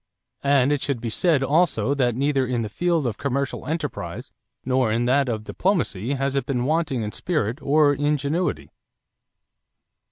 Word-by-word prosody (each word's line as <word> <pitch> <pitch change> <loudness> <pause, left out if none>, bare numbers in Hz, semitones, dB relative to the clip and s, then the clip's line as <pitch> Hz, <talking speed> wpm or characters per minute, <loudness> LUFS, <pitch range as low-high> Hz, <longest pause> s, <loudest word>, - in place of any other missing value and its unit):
And 140 -1 +3
it 145 -2 0
should 140 -4 -1
be 115 -1 -4
said 155 0 +2
also 145 0 +2
that 125 -4 +1
neither 135 0 +1
in 120 -2 -1
the 105 - -4
field 170 +4 0
of 115 -4 -3
commercial 140 -1 -2
enterprise 155 -2 -4 0.3
nor 130 -3 +2
in 115 +2 +1
that 135 +1 +2
of 110 -2 -2
diplomacy 140 - -1
has 135 0 -1
it 140 - -1
been 125 -3 -1
wanting 155 -5 0
in 105 - -4
spirit 140 - -2
or 145 0 +4
ingenuity. 145 +4 -1
140 Hz, 160 wpm, -23 LUFS, 125-150 Hz, 0.3 s, or